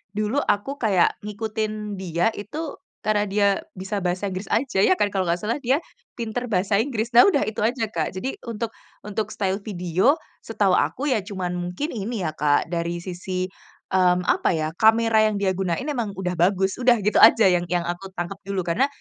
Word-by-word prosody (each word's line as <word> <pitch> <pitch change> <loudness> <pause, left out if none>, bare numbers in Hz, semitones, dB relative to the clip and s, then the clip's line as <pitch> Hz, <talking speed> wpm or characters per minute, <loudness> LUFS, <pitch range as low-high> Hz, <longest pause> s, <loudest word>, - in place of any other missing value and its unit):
dulu 215 +6 0
aku 275 +5 -1
kayak 195 -6 +2
ngikutin 215 -1 -4
dia 175 +3 0
itu 285 - -6 0.2
karena 210 -1 +1
dia 200 +1 +2 0.3
bisa 195 +2 -3
bahasa 185 +2 -2
Inggris 185 +2 -5
aja, 230 -2 0
ya 290 - +5
kan, 205 - 0
kalau 190 -2 -1
nggak 170 +3 -1
salah 230 +7 -1
dia 275 +4 +1 0.3
pinter 240 +1 -3
bahasa 200 -1 +1
Inggris. 230 -1 -1
Nah, 240 +6 +8
udah, 325 -8 +3
itu 215 - -4
aja, 230 +3 0
Kak. 165 -2 -2
Jadi 255 +9 -4
untuk 225 0 -3 0.3
untuk 210 0 -3
style 195 -2 -2
video 190 - +1 0.2
setahu 205 -4 0
aku 270 +9 +1
ya, 240 - +2
cuman 190 -3 -4
mungkin 180 - -3
ini 220 -1 -3
ya, 155 - -1
Kak, 150 +1 +1
dari 170 0 -2
sisi, 185 0 -4 0.5
mmm, 180 -1 +3
apa 180 - +2
ya, 155 -1 -1
kamera 225 0 +4
yang 215 - -1
dia 200 -1 +1
gunain 185 +1 -2
emang 240 -9 -3
udah 180 -1 -2
bagus. 190 +3 +2
Udah 245 -1 +5
gitu 210 - +3
aja 225 0 +8
yang 175 0 +1
yang 175 0 0
aku 175 +3 -4
tangkep 175 +3 -4
dulu, 195 -2 -1
karena 180 +11 +1
205 Hz, 190 wpm, -23 LUFS, 180-225 Hz, 0.5 s, Nah